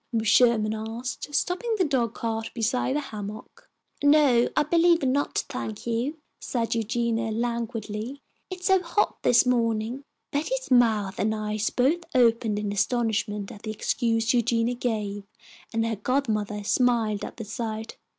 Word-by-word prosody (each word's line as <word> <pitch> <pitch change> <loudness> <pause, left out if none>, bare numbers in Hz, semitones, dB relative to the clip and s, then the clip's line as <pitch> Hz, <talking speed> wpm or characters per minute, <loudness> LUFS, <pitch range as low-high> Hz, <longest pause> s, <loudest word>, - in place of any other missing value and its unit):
Mrs. 225 -2 0
Sherman 220 -1 +4
asked, 230 +6 -5
stopping 445 +6 0
the 375 - +3
dog 250 - 0
cart 225 -1 -3
beside 250 +3 0
the - - +2
hammock. 215 -5 -8 0.3
"No, 285 -5 +5
I 300 - +5
believe 335 +1 +3
not, 270 +2 0
thank 220 -6 -5
you," 240 +7 -1 0.2
said 235 -2 -2
Eugenia, 230 0 -1
languidly. 230 +2 -3 0.3
"It's 365 -1 -7
so 380 -1 +4
hot 360 +4 0
this 245 +1 +5
morning." 235 +1 0 0.3
Betty's 385 - -2
mouth 220 -6 +3
and 220 +1 +1
eyes 215 0 -1
both 280 +8 +2
opened 230 -3 +3
in 210 -1 -2
astonishment 210 -1 -1
at 205 - -11
the 220 - -6
excuse 225 +1 0
Eugenia 235 0 +2
gave, 210 -5 -3 0.5
and 225 -1 0
her 225 -2 -2
godmother 215 -4 -1
smiled 225 -2 +1
at - - -7
the 225 - -6
sight. 220 0 -5
230 Hz, 145 wpm, -26 LUFS, 220-255 Hz, 0.5 s, No